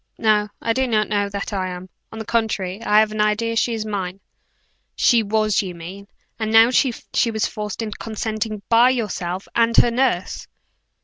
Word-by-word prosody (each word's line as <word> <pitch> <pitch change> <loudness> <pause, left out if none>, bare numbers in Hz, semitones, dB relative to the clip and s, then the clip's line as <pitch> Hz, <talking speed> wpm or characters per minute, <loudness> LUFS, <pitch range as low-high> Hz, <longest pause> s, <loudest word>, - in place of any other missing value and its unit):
"No, 210 -1 +2 0.2
I 230 - +1
do 260 +2 0
not 215 -3 +1
know 205 -1 0
that 200 +1 -5
I 190 -2 -1
am. 180 0 -7 0.2
On 220 - -9
the 220 - -6
contrary, 210 -4 -1
I 210 -2 +2
have 215 -1 0
an 215 0 -1
idea 220 +2 0
she 230 +1 +1
is 215 -1 -4
mine." 195 -3 -4 0.8
"She 235 -2 +4
was, 215 0 +1
you 185 -3 -6
mean. 185 +4 -9 0.3
You 220 - -1
know 225 +2 +6
she 245 -2 +1
was 220 -2 -1
forced 210 +1 -5
into 215 -2 -6
consenting 215 -1 -4
by 235 +2 +5
yourself 195 -7 -3
and 230 0 +2
her 240 - +6
nurse!" 235 -7 -1
215 Hz, 185 wpm, -21 LUFS, 200-230 Hz, 0.8 s, know